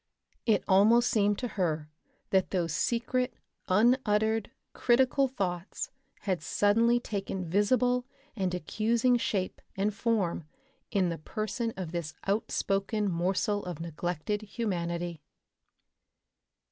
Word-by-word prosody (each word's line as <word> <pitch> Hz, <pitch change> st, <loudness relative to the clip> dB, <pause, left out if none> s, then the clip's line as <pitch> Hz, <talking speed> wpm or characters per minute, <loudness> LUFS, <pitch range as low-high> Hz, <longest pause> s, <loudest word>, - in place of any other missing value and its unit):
It 215 Hz, -4 st, +3 dB
almost 220 Hz, +5 st, +5 dB
seemed 205 Hz, -3 st, +3 dB
to 250 Hz, -, -2 dB
her 160 Hz, -7 st, -1 dB, 0.4 s
that 190 Hz, -1 st, +3 dB
those 170 Hz, -4 st, -1 dB
secret, 245 Hz, +7 st, 0 dB, 0.3 s
unuttered, 220 Hz, 0 st, +3 dB, 0.2 s
critical 260 Hz, +3 st, +3 dB
thoughts 185 Hz, -7 st, -3 dB, 0.3 s
had 185 Hz, -5 st, -1 dB
suddenly 230 Hz, +8 st, +3 dB
taken 195 Hz, -5 st, -4 dB
visible 245 Hz, +7 st, +2 dB, 0.3 s
and 190 Hz, -4 st, 0 dB
accusing 230 Hz, +8 st, +2 dB
shape 195 Hz, -5 st, -2 dB, 0.2 s
and 205 Hz, +2 st, +1 dB
form 200 Hz, -7 st, 0 dB, 0.4 s
in 190 Hz, -5 st, +2 dB
the 165 Hz, -, -4 dB
person 215 Hz, -, -3 dB
of 180 Hz, -4 st, -4 dB
this 170 Hz, -3 st, -4 dB
outspoken 200 Hz, 0 st, 0 dB
morsel 190 Hz, +4 st, 0 dB
of 175 Hz, -4 st, -5 dB
neglected 170 Hz, +4 st, -3 dB
humanity. 175 Hz, -6 st, -3 dB
205 Hz, 110 wpm, -29 LUFS, 180-230 Hz, 0.4 s, almost